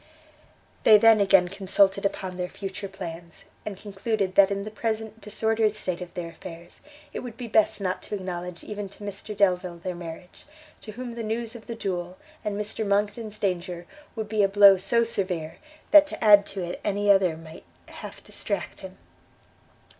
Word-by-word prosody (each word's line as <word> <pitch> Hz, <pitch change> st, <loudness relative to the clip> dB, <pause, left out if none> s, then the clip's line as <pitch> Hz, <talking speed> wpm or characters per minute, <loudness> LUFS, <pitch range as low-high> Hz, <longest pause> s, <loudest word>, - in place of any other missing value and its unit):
They 215 Hz, -, +8 dB
then 225 Hz, 0 st, +6 dB
again 195 Hz, -2 st, +5 dB
consulted 195 Hz, +1 st, +2 dB
upon 185 Hz, -2 st, -6 dB
their 180 Hz, 0 st, -3 dB
future 195 Hz, 0 st, -6 dB
plans; 170 Hz, -3 st, -9 dB, 0.2 s
and 200 Hz, -3 st, -5 dB
concluded 200 Hz, -1 st, -2 dB
that 195 Hz, 0 st, +6 dB
in 200 Hz, 0 st, -2 dB
the 215 Hz, -, -7 dB
present 220 Hz, 0 st, -3 dB
disordered 215 Hz, +1 st, +1 dB
state 185 Hz, -4 st, -3 dB
of 175 Hz, -1 st, -7 dB
their 175 Hz, -2 st, -4 dB
affairs, 170 Hz, 0 st, -11 dB, 0.3 s
it -, -, -3 dB
would 240 Hz, -3 st, -8 dB
be 245 Hz, -, -6 dB
best 215 Hz, -1 st, +3 dB
not 185 Hz, -2 st, -2 dB
to -, -, -5 dB
acknowledge 180 Hz, -2 st, -5 dB
even 205 Hz, -1 st, -6 dB
to 205 Hz, -, -13 dB
Mr 205 Hz, +1 st, -6 dB
Delvile 180 Hz, -3 st, +2 dB
their 180 Hz, +2 st, -4 dB
marriage, 175 Hz, +1 st, -10 dB, 0.4 s
to 215 Hz, -, -9 dB
whom 245 Hz, +2 st, -6 dB
the 235 Hz, 0 st, -6 dB
news 225 Hz, +1 st, -3 dB
of 225 Hz, -, -11 dB
the 235 Hz, -, -5 dB
duel, 180 Hz, -4 st, -4 dB, 0.3 s
and 210 Hz, -1 st, -2 dB
Mr 210 Hz, +1 st, -2 dB
Monckton's 210 Hz, +1 st, -1 dB
danger, 180 Hz, -3 st, -2 dB, 0.3 s
would 220 Hz, -2 st, -4 dB
be 215 Hz, 0 st, +1 dB
a 200 Hz, -, +5 dB
blow 200 Hz, 0 st, +8 dB
so 195 Hz, +5 st, +2 dB
severe, 185 Hz, -8 st, -2 dB, 0.3 s
that, 305 Hz, -1 st, +9 dB
to 280 Hz, -, -6 dB
add 205 Hz, -2 st, +7 dB
to 195 Hz, -2 st, -4 dB
it 175 Hz, 0 st, -5 dB
any 205 Hz, 0 st, +2 dB
other 185 Hz, -5 st, +3 dB
might 165 Hz, +1 st, -12 dB, 0.2 s
half -, -, -10 dB
distract -, -, -4 dB
him. -, -, -10 dB
200 Hz, 180 wpm, -26 LUFS, 180-215 Hz, 0.4 s, that